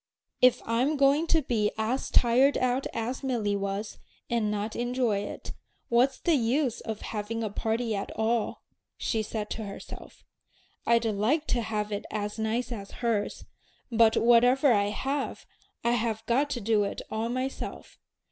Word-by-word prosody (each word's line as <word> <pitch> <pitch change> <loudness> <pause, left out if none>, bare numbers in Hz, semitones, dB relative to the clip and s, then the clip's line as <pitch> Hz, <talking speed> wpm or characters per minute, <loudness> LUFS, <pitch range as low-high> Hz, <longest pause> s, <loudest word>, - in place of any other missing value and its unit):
"If 250 -1 +5
I'm 250 +7 +1
going 280 +4 +4
to 320 -2 +3
be 220 -5 +1
as 225 +5 -1
tired 255 +4 +4
out 255 +1 +1
as 240 +3 -3
Milly 225 -6 0
was, 200 +1 -3 0.3
and 230 -3 +1
not 210 +1 -2
enjoy 240 -3 0
it, 205 - -6 0.4
what's 250 +3 +3
the 340 - +1
use 255 0 +1
of 220 -1 -5
having 225 +1 -4
a 215 - -2
party 225 +1 -1
at 200 - -3
all?" 220 +1 0 0.3
she 220 - 0
said 210 0 -4
to 220 - -3
herself. 200 - -10 0.6
"I'd 235 0 +4
like 225 +9 +1
to 240 - +1
have 215 -1 -2
it 205 - -4
as 210 0 -3
nice 230 +3 -1
as 200 -4 -6 0.2
hers; 215 -3 -1 0.5
but 225 -1 +5
whatever 245 +3 +5
I 200 -2 +3
have, 270 +7 -3 0.4
I 235 - +2
have 225 -2 -1
got 275 +5 +2
to 255 -4 -3
do 210 0 +2
it 200 - -4
all 220 +1 -1
myself. 255 +2 -5
230 Hz, 160 wpm, -28 LUFS, 215-250 Hz, 0.6 s, If